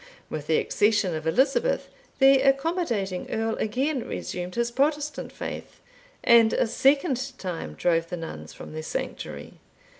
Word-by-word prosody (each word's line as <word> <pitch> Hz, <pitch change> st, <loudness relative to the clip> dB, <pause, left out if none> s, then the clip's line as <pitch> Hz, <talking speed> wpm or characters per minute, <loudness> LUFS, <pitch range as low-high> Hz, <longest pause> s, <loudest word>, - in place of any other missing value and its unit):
With 150 Hz, -1 st, -5 dB
the 160 Hz, -, +3 dB
accession 210 Hz, -3 st, +2 dB
of 155 Hz, 0 st, -4 dB
Elizabeth, 270 Hz, -, +2 dB, 0.3 s
the 270 Hz, 0 st, +6 dB
accommodating 270 Hz, -, 0 dB
Earl 225 Hz, 0 st, -1 dB
again 260 Hz, +4 st, -1 dB
resumed 180 Hz, 0 st, -5 dB
his 235 Hz, 0 st, 0 dB
Protestant 295 Hz, +3 st, -1 dB
faith, -, -, -7 dB, 0.4 s
and 230 Hz, -1 st, +6 dB
a -, -, +2 dB
second 270 Hz, +1 st, +1 dB
time 165 Hz, -, -5 dB
drove 165 Hz, -, +1 dB
the 180 Hz, -, -4 dB
nuns 80 Hz, -, -7 dB
from 80 Hz, -, -10 dB
their 155 Hz, -, -4 dB
sanctuary. 155 Hz, -, -6 dB
225 Hz, 140 wpm, -26 LUFS, 175-275 Hz, 0.4 s, the